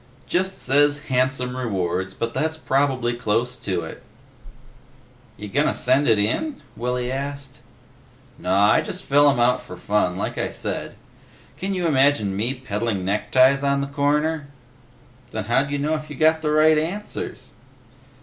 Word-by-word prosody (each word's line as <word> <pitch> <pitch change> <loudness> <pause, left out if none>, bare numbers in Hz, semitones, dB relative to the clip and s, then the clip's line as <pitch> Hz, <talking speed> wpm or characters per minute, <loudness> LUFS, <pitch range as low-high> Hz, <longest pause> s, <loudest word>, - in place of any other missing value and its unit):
"Just 190 +2 0
says 145 +2 +3
'handsome 130 0 0
rewards,' 95 -6 -2
but 115 0 -3
that's 160 +1 -1
probably 135 -5 0
close 120 +1 -1
to 95 -7 -2
it." 80 - -8 1.4
"You 105 - -7
gonna 145 +9 +1
send 130 +3 +2
it 110 -2 +4
in?" 260 - -1 0.2
Willy 125 +1 -2
asked. 140 -1 -5 0.8
"Naw, 100 +3 +3
I - - +4
just 185 - -6
fill 145 +1 +5
'em 135 - +1
out 125 +1 +3
for 90 - -10
fun, 95 -1 0
like - - -3
I - - -1
said. - - -5 0.6
Can 195 +1 -3
you 180 -2 -1
imagine 135 -9 +2
me 115 +7 -1
peddling 105 -5 -3
neckties 130 +7 +3
on 140 0 +1
the - - -1
corner?" 145 +2 0 0.8
"Then 110 - -4
how 120 +6 +2
d'ya 145 0 -3
know 150 +2 0
if 155 -1 -4
you 145 - -7
got 160 +2 +3
the 155 - -1
right 155 0 +5
answers?" 185 +7 -5
130 Hz, 155 wpm, -22 LUFS, 115-145 Hz, 1.4 s, fill